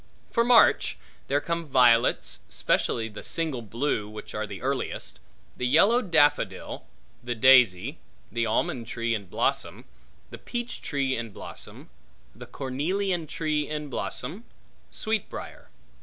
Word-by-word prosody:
For 235 - +3
March, 240 -1 +5 0.3
there 140 +2 +2
come 170 +1 -3
violets, 120 -4 +4
specially 115 -1 +1
the 105 -2 -9
single 160 -7 -1
blue, 115 -1 -2
which 105 0 -9
are - - -3
the - - -7
earliest; - - -3 0.4
the 125 - -1
yellow 200 - +5
daffodil; 160 -8 +1 0.4
the 120 0 -3
daisy; 125 - +5 0.3
the 115 0 0
almond 115 +1 -1
tree 115 0 -1
in 100 -4 -4
blossom; - - -1 0.5
the - - -9
peach 240 0 -5
tree 135 -3 0
in 115 -1 -4
blossom; 100 - -8 0.4
the 120 +3 -11
cornelian 165 +8 -2
tree 150 -1 -1
in 150 -1 -4
blossom; 195 - -4 0.4
sweet 220 -2 -1
briar. - - -9
135 Hz, 130 wpm, -27 LUFS, 115-165 Hz, 0.5 s, March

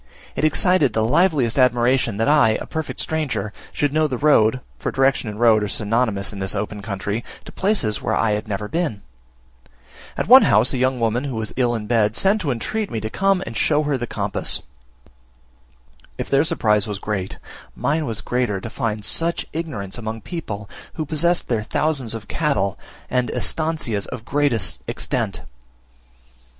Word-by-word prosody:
It - - -2
excited 155 - +3
the 110 - +1
liveliest 140 -3 +2
admiration 120 -2 +3
that 115 - +1
I, 145 -7 +4
a - - -6
perfect 160 -2 -5
stranger, 125 -10 -2 0.2
should 145 -1 0
know 155 0 +3
the 130 -4 -3
road 130 -4 +4 0.2
(for - - -2
direction 135 -3 +2
and 105 0 -7
road 115 -2 +5
are 105 - -1
synonymous 105 -1 0
in 100 - -7
this 95 +1 0
open 105 0 -3
country) 100 +2 -3 0.2
to - - -9
places 185 - +1
where - - 0
I 115 - +2
had 105 +1 -2
never 105 0 -3
been. 155 - -2 1.1
At - - -1
one - - +10
house 110 +7 +4
a 130 - -1
young 130 0 +1
woman, 115 +3 0
who 135 -4 -4
was 110 -2 -3
ill 120 -2 +1
in 110 -2 -4
bed, 110 -1 +2
sent 205 +2 +2
to 155 - -2
entreat 200 - -2
me 115 - -3
to 110 +1 -5
come 195 -1 +2
and 115 - -7
show 150 +6 +2
her 145 -1 0
the 120 -2 -3
compass. - - -2 1.5
If - - -5
their 140 +1 +4
surprise 105 -8 +1
was 105 -2 -3
great, 100 -2 -4 0.4
mine 150 +1 0
was 110 -3 -3
greater, 120 -5 -1
to 115 - -7
find 110 -5 -3
such 170 +1 +1
ignorance 120 - -4
among 110 0 -5
people 105 - -6 0.3
who 155 - -3
possessed 170 +4 +1
their 115 -3 0
thousands 130 0 -1
of 105 -2 -8
cattle, 120 - 0 0.3
and 125 -1 0
"estancias" 155 -11 -1
of 110 - -7
great 145 -2 +1 0.3
extent. - - -2
120 Hz, 175 wpm, -21 LUFS, 105-150 Hz, 1.5 s, one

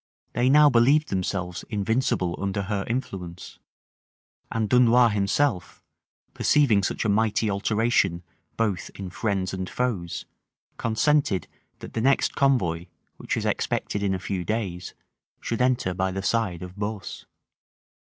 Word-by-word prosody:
They 125 +2 +2
now 150 +2 +7
believed 140 +4 +4
themselves 90 -2 -2
invincible 105 -4 0
under 100 0 -1
her 100 0 -2
influence; 95 -8 -5 0.9
and 110 -2 0
Dunois 125 +1 +5
himself, 105 +1 0 0.5
perceiving 130 -9 +3
such 95 - -2
a - - +3
mighty 110 0 +1
alteration 100 -3 +1 0.3
both 105 -6 -1
in 95 -2 -7
friends 95 -2 -2
and 95 -1 -4
foes, 105 -9 -2 0.5
consented, 115 -2 +1 0.3
that - - -9
the 115 - -1
next 135 +3 +2
convoy, 90 -12 +1 0.3
which - - -3
was - - -2
expected 100 - -1
in 100 -2 +1
a - - -4
few 90 0 -3
days, 90 -3 -3 0.4
should 115 +1 -3
enter 125 -7 +1
by 95 +1 0
the 95 +1 -4
side 100 -6 0
of 90 0 -9
Beausse. 105 -1 -5
105 Hz, 130 wpm, -25 LUFS, 95-120 Hz, 0.9 s, now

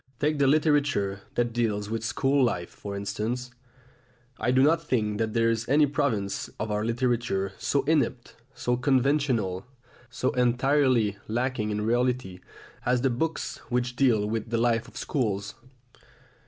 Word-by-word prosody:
Take 150 0 +1
the 140 - +4
literature 145 -10 +2
that 120 -1 0
deals 105 -3 0
with 110 +1 -3
school 135 +6 +2
life, 90 -8 -1
for 100 -1 -7
instance. 115 +5 -3 0.9
I - - 0
do 130 +1 +4
not 165 +3 +4
think 105 -7 -1
that 110 0 -1
there 115 0 +3
is 115 +1 -3
any 150 +2 +5
province 130 -9 -1
of 110 0 -2
our 105 0 0
literature 115 -4 0
so 140 -1 +1
inept, 140 -4 0 0.2
so 125 - 0
conventional, 130 -7 +1 0.4
so 130 +1 -1
entirely 125 -3 +2
lacking 120 -1 -1
in 105 0 -2
reality, 120 -5 0 0.4
as 125 0 +1
the 135 0 +2
books 160 +7 -2
which 125 0 -1
deal 120 -6 +3
with 110 +1 -3
the 115 - 0
life 115 0 +1
of - - -13
schools. 100 -8 -2
120 Hz, 150 wpm, -27 LUFS, 105-135 Hz, 0.9 s, any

